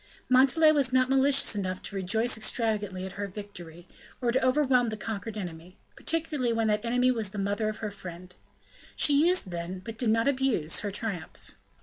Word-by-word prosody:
Montalais 275 +5 +5
was 280 -4 +2
not 255 0 +3
malicious 270 0 +4
enough 185 -2 -3
to - - -7
rejoice 220 +6 0
extravagantly 215 -4 -1
at 190 - -6
her 205 +2 -5
victory, 180 -4 -10 0.3
or 240 -2 0
to 260 +2 +1
overwhelm 255 -2 +3
the 215 - -5
conquered 220 0 -5
enemy, 175 -2 -8 0.2
particularly 305 -6 -1
when 225 -1 0
that 210 0 0
enemy 250 +2 +2
was 225 -5 -2
the 205 - -9
mother 205 +2 -1
of 215 - -5
her 210 - -3
friend; 180 -2 -10 0.6
she 295 +2 +4
used 355 - +1
then, 175 +2 -5
but 225 +5 -9
did 240 - +1
not 225 +3 +2
abuse 260 - +1
her 205 - -3
triumph. 200 -5 -5
220 Hz, 185 wpm, -28 LUFS, 190-255 Hz, 0.6 s, Montalais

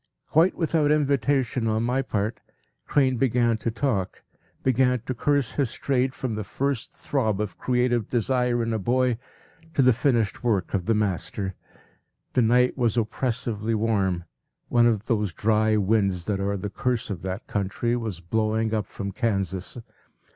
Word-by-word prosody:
Quite 165 +4 +3
without 160 -3 +1
invitation 135 -4 +1
on 110 +1 +1
my 125 +3 +1
part, 110 -3 -2 0.5
Crane 130 -3 +2
began 120 -2 +2
to 115 - -2
talk, 110 -5 -2 0.4
began 125 0 +3
to 125 +2 -4
curse 140 0 +1
his 135 -5 -1
trade 130 -1 0
from 125 -4 -3
the 110 0 -3
first 135 +4 -2
throb 110 -8 -1
of 105 -4 -4
creative 125 -3 +1
desire 125 0 +1
in 115 0 -1
a 110 - 0
boy 125 +2 +1 0.6
to 135 - +4
the 130 -1 +6
finished 115 -3 0
work 105 -7 0
of 95 -2 -1
the 115 - +3
master. 100 -1 -1 0.8
The 125 - +3
night 125 +2 +3
was 120 -3 +1
oppressively 115 -1 -1
warm; 100 -5 0 0.5
one 120 -1 +5
of 110 -2 0
those 105 -7 0
dry 110 +1 +2
winds 100 -4 +1
that 100 -2 -1
are 100 +1 -1
the 100 +1 -5
curse 120 0 -1
of 90 -4 -5
that 95 +3 -4
country 105 +4 -1
was 110 -7 -4
blowing 110 +4 0
up 105 -3 -1
from 100 0 -5
Kansas. 95 -5 -2
115 Hz, 160 wpm, -25 LUFS, 105-125 Hz, 0.8 s, the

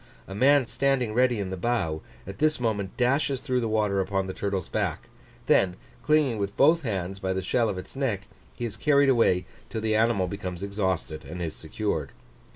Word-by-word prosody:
A 95 - -7
man 135 +5 +4
standing 125 -1 0
ready 125 -1 +3
in 95 -2 -3
the - - -2
bow, 85 -7 -1 0.2
at 95 +1 -8
this 155 -2 +2
moment 105 -5 -2
dashes 135 +2 +2
through 130 -2 0
the 115 - -1
water 105 -3 +1
upon 95 0 -1
the 95 - -5
turtle's 100 -4 -2
back; - - -2 0.4
then 90 -2 +3 0.3
clinging 150 -7 +2
with 100 0 -3
both 160 +4 +5
hands 95 - -3
by 95 -1 -1
the 95 - -1
shell 115 +4 +1
of 100 - -3
its 95 - -9
neck, 115 -8 -1 0.3
he 120 - -4
is 110 -2 -5
carried 140 +2 +4
away 105 -8 +3 0.2
till 110 - -4
the 110 0 +1
animal 110 -3 +3
becomes 90 -1 -5
exhausted 95 -6 -2
and 80 +5 -8
is 85 -3 -3
secured. - - -3
105 Hz, 195 wpm, -26 LUFS, 95-125 Hz, 0.4 s, both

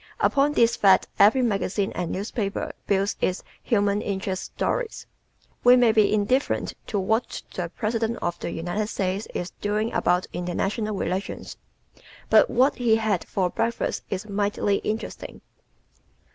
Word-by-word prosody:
Upon 285 +1 +3
this 235 -4 +4
fact 195 -2 +5
every 220 +6 +6
magazine 200 -2 0
and 175 -2 -3
newspaper 200 +1 -3 0.2
builds 200 +1 +1
its 185 - 0 0.2
"human 205 -3 +1
interest" 190 -1 -3
stories. - - -3 0.6
We 245 +1 +8
may 245 -2 +5
be 215 -2 +3
indifferent 215 +6 +1
to 210 - -2
what 220 +5 -1
the 175 -2 -3
President 225 +1 -1
of 175 0 -3
the - - -4
United 175 +6 -2
States 195 0 -2
is 175 - -3
doing 210 +2 -1
about 180 +1 +2
international 195 +5 -2
relations 190 0 -3 0.8
but - - +6
what 265 +3 +3
he 235 -3 +3
had 220 -5 0
for 185 -3 0
breakfast 230 +1 -1
is 195 +2 -4
mighty 205 0 0
interesting. 220 +2 -5
205 Hz, 140 wpm, -25 LUFS, 190-225 Hz, 0.8 s, We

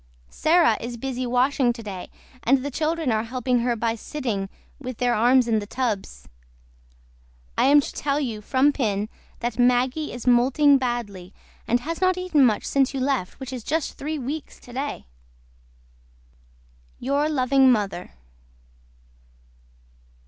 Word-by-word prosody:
SARAH 320 -8 +3
IS 235 +1 -5
BUSY 255 0 -3
WASHING 250 0 +2
TODAY 205 -6 -7 0.3
AND 265 +2 +2
THE 285 - -3
CHILDREN 315 -1 -1
ARE 220 0 0
HELPING 250 +1 0
HER 240 0 0
BY 230 0 0
SITTING 225 -5 -4 0.3
WITH 255 -4 -6
THEIR 245 -1 +1
ARMS 245 +2 +4
IN 220 -2 +2
THE 205 - -7
TUBS. 230 -5 -3 1.3
I - - +3
AM 290 +2 +6
TO - - -6
TELL 285 0 -1
YOU 230 -7 -3
FROM 265 +6 +2
PIN 210 -6 -1 0.3
THAT 240 +1 -3
MAGGY 250 +5 +2
IS 245 - -8
MOULTING 265 +4 +4
BADLY 210 -7 -4 0.3
AND 240 +2 +2
HAS 330 +5 -5
NOT 370 0 +3
EATEN 365 -6 +2
MUCH 220 -5 +2
SINCE 275 0 +1
YOU - - -1
LEFT 260 -8 -1
WHICH 265 -1 -7
IS 250 -3 -6
JUST 315 +4 -2
THREE 305 +2 -3
WEEKS 285 +3 -6
TODAY 265 +4 -5 1.9
YOUR 280 +4 0
LOVING 265 -2 +4
MOTHER. 200 -6 -2
255 Hz, 140 wpm, -24 LUFS, 235-280 Hz, 1.9 s, AM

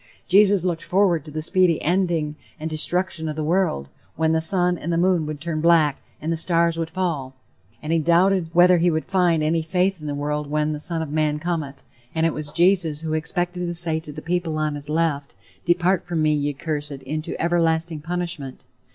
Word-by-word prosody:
Jesus 200 -1 +4
looked 170 -2 -1
forward 180 -5 +2
to - - -9
the 155 +1 -4
speedy 180 -1 +3
ending 170 -3 0 0.2
and 155 - -4
destruction 170 +1 -1
of 155 - -4
the 155 - -3
world, 165 - 0 0.3
"when 160 0 +1
the 160 0 +2
sun 180 +1 +2
and 170 0 -2
moon 175 -3 +2
would 150 -1 -5
turn 160 -1 -3
black, 160 -4 +3 0.2
and 160 +2 -2
the - - -2
stars 170 0 +1
would 165 -1 -3
fall;" 160 -7 -3 0.5
and 155 +2 -1
he 165 - +3
doubted 175 +2 +3
whether 175 +1 +5
he 175 +1 +3
would 160 -1 -1
find 175 -4 +2
any 165 +2 +1
faith 180 +2 0
in 150 - -6
the 145 - -2
world 150 0 -3
when 150 +1 0
"the 150 - -5
son 165 +1 -2
of 150 - -7
man 155 -1 +1
cometh"; 155 -4 -4 0.3
and 160 0 +2
it 165 - +1
was 150 -1 -2
Jesus 170 -3 +2
who 160 -1 -3
expected 175 +3 -2
to 175 -1 -3
say 165 -2 +2
to 155 -2 -9
the - - -9
people 170 -1 -1
on 155 -1 -1
his 145 0 -7
left, 155 -2 -1 0.3
"depart 175 +1 +2
from 165 -3 -1
me, 155 0 +3
ye 145 0 -1
cursed, 145 0 -4
into 155 +4 -4
everlasting 165 -2 +1
punishment." 170 -5 -5
165 Hz, 205 wpm, -23 LUFS, 155-175 Hz, 0.5 s, whether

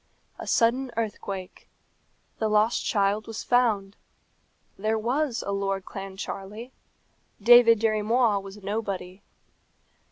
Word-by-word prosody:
A - - -7
sudden 250 +3 +2
earthquake. 200 -4 -5 0.7
The 220 - 0
lost 215 +2 +2
child 205 0 0
was 225 -1 -6
found. 215 -5 +1 0.8
There 215 +2 -1
was 245 +3 -1
a 200 - -2
Lord 195 -1 -2
Clancharlie; 195 +4 -7 0.7
David 230 +1 +7
Dirry 215 -1 +1
Moir 225 -1 +2
was 195 +1 -10
nobody. 195 -2 -4
215 Hz, 105 wpm, -26 LUFS, 195-230 Hz, 0.8 s, David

